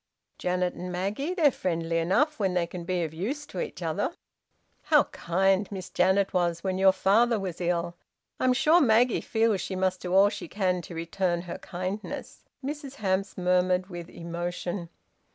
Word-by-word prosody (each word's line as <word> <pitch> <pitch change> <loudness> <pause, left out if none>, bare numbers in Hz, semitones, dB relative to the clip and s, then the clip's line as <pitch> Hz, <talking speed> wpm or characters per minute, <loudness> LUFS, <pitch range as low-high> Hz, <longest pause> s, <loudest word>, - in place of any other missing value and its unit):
"Janet 180 0 0
and 180 +1 -6
Maggie? 205 - -2
They're 310 -6 +5
friendly 165 -5 -1
enough 280 - +1
when 190 -3 +1
they 175 -1 +2
can 170 0 -7
be 180 -1 0
of 160 -1 -4
use 250 - -3
to - - -7
each 485 - -4
other." - - -1 0.7
"How - - +5
kind 190 +3 +1
Miss 190 -3 -6
Janet 190 +2 +2
was 170 -2 0
when 190 -1 -1
your 190 0 +7
father 220 +5 +3
was 185 -3 -5
ill! 170 0 -1 0.4
I'm 255 0 +3
sure 310 +7 +5
Maggie 240 -1 +4
feels 220 -4 +1
she 190 - -4
must 185 0 0
do 180 - -4
all 200 +1 +7
she 205 - -6
can 185 -3 0
to 170 - -9
return 170 +1 -1
her 175 - -6
kindness," 185 +4 -6 0.2
Mrs 285 -1 -5
Hamps 195 -4 -1
murmured, 180 +1 +2
with 175 -1 -7
emotion. 175 +1 -4
185 Hz, 170 wpm, -27 LUFS, 175-210 Hz, 0.7 s, your